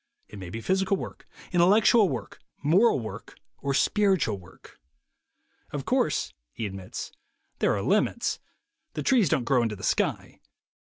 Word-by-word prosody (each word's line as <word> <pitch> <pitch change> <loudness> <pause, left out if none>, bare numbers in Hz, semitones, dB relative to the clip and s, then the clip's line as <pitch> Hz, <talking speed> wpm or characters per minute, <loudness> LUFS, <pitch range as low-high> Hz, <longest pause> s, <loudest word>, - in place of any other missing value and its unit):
It 105 - -10
may 95 -2 -7
be 115 +5 -6
physical 190 - +1
work, - - -8 0.2
intellectual 200 +4 +5
work, 120 -8 -6 0.2
moral 175 - +4
work, 110 -2 -8 0.2
or 140 -1 -1
spiritual 190 - +2
work. 90 - -17 0.9
"Of - - -5
course," - - 0 0.2
he 115 - -4
admits, 95 -2 -6 0.5
"there - - +2
are 100 - -2
limits: 210 +4 +1 0.5
the - - -4
trees 240 - +3
don't 130 - +1
grow 125 0 +3
into 115 -2 -1
the 95 - -12
sky. - - -1
140 Hz, 145 wpm, -27 LUFS, -, 0.9 s, intellectual